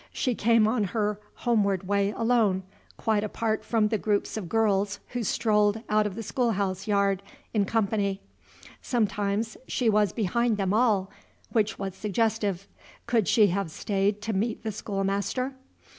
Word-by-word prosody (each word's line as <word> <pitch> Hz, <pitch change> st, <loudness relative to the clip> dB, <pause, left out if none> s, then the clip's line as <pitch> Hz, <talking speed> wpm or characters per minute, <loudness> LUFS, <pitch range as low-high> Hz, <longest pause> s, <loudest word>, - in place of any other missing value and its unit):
She 255 Hz, -, 0 dB
came 230 Hz, -1 st, +3 dB
on 220 Hz, -2 st, +1 dB
her 210 Hz, -1 st, 0 dB, 0.2 s
homeward 200 Hz, -6 st, +1 dB
way 200 Hz, 0 st, +2 dB
alone, 225 Hz, -4 st, +1 dB, 0.3 s
quite 215 Hz, -2 st, +1 dB
apart 220 Hz, +1 st, -1 dB
from 215 Hz, -1 st, +1 dB
the 220 Hz, -1 st, 0 dB
groups 205 Hz, 0 st, 0 dB
of 200 Hz, -6 st, -5 dB
girls 205 Hz, -3 st, +1 dB
who 245 Hz, -, -3 dB
strolled 210 Hz, 0 st, +2 dB
out 210 Hz, 0 st, +3 dB
of 195 Hz, -, -6 dB
the 225 Hz, -, -5 dB
schoolhouse 200 Hz, -5 st, -1 dB
yard 200 Hz, -2 st, +2 dB, 0.3 s
in 210 Hz, -3 st, +2 dB
company. 200 Hz, -2 st, 0 dB, 0.6 s
Sometimes 215 Hz, -1 st, -1 dB
she 235 Hz, -3 st, +1 dB
was 210 Hz, -1 st, +3 dB
behind 230 Hz, +1 st, 0 dB
them 195 Hz, -1 st, 0 dB
all, 210 Hz, -4 st, +2 dB, 0.4 s
which 220 Hz, -1 st, +1 dB
was 195 Hz, -1 st, -4 dB
suggestive. 210 Hz, -2 st, -1 dB, 0.4 s
Could 230 Hz, -4 st, +1 dB
she 215 Hz, -1 st, +5 dB
have 190 Hz, -1 st, -1 dB
stayed 200 Hz, +4 st, -1 dB
to 220 Hz, +1 st, -2 dB
meet 215 Hz, +4 st, -1 dB
the 220 Hz, -, -2 dB
schoolmaster? 200 Hz, +6 st, -2 dB
210 Hz, 150 wpm, -27 LUFS, 200-225 Hz, 0.6 s, she